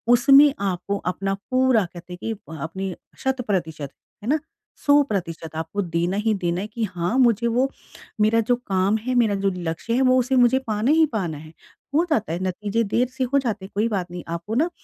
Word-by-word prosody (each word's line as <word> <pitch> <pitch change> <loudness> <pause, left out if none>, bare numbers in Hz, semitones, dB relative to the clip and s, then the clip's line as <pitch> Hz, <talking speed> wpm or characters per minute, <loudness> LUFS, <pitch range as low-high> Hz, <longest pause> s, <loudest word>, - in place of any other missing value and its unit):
उसमें 275 +3 +7
आपको 200 0 -2 0.2
अपना 195 +1 -2 0.2
पूरा 255 -5 +3
कहते 175 0 -10
हैं - - -7
कि 225 - -2 0.2
अ, - - -6
अपनी 190 +3 -4 0.3
शत-प्रतिशत 190 - -2 0.3
है 225 - -4
ना, 310 +2 +3 0.5
100% 195 - +1
आपको 160 +5 -3
देना 175 +1 -1
ही 215 +1 +1
देना 175 +1 0
है 205 - -4
कि 230 +1 -4
हाँ, 180 +2 -1
मुझे 235 -2 +3
वो 250 +4 +1 0.5
मेरा 220 +2 +4
जो - - +5
काम 200 -3 0
है, 250 +4 -3
मेरा 225 -4 +3
जो 195 0 0
लक्ष्य 170 +6 -3
है, 250 - +2
वो 255 -1 +4
उसे 255 +2 +1
मुझे 250 +1 +5
पाना 215 +4 +1
ही 320 +1 +5
पाना 170 -7 -3
है। 155 +1 -12 0.4
हो 325 - +4
जाता 220 - 0
है 170 - -2
नतीजे 205 +4 -1
देर 250 +2 +2
से 260 0 -3
हो 280 - +6
जाते 220 -7 -3
हैं 195 - -13
कोई 215 +3 +2
बात 185 -5 -3
नहीं, 175 -1 -6
आपको 170 +6 -4
ना 315 +8 +2
210 Hz, 205 wpm, -23 LUFS, 180-250 Hz, 0.5 s, उसमें